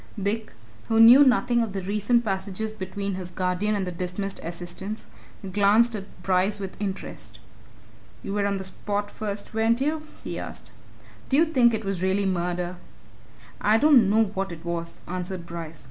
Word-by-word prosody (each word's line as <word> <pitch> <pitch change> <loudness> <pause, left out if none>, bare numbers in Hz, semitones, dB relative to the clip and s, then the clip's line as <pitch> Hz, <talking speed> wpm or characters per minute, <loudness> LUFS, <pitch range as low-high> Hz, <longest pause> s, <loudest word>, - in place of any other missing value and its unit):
Dick, 215 +3 -2 0.4
who 225 0 +2
knew 240 +5 +10
nothing 245 -2 +3
of 220 -4 -2
the 195 - -3
recent 210 +5 +1
passages 195 +2 -3
between 200 0 -4
his 185 -1 -5
guardian 185 +4 0
and 195 -2 -1
the 180 - -4
dismissed 180 +3 -4
assistant, 175 +5 -5 0.5
glanced 215 +4 +4
at 200 -1 -9
Bryce 190 +2 +1
with 195 -2 -6
interest. 195 -2 -5 0.8
"You 195 - -4
were 200 -1 +1
on 200 -1 0
the 190 - -5
spot 205 +2 -3
first, 205 -1 -5
weren't 225 +2 +2
you?" 305 +3 0 0.2
he - - -4
asked: - - -7 0.6
"Do 270 - +4
you 325 - +6
think 250 -8 +4
it 220 -1 -5
really 195 +1 0
was 190 - +2
murder?" 180 0 -2 0.8
"I 215 +2 +4
don't 250 -6 +6
know 220 +2 +4
what 195 -2 -3
it 170 0 -9
was," 170 -1 -4
answered 180 0 -4
Bryce. 165 -2 -7
200 Hz, 170 wpm, -25 LUFS, 185-220 Hz, 0.8 s, knew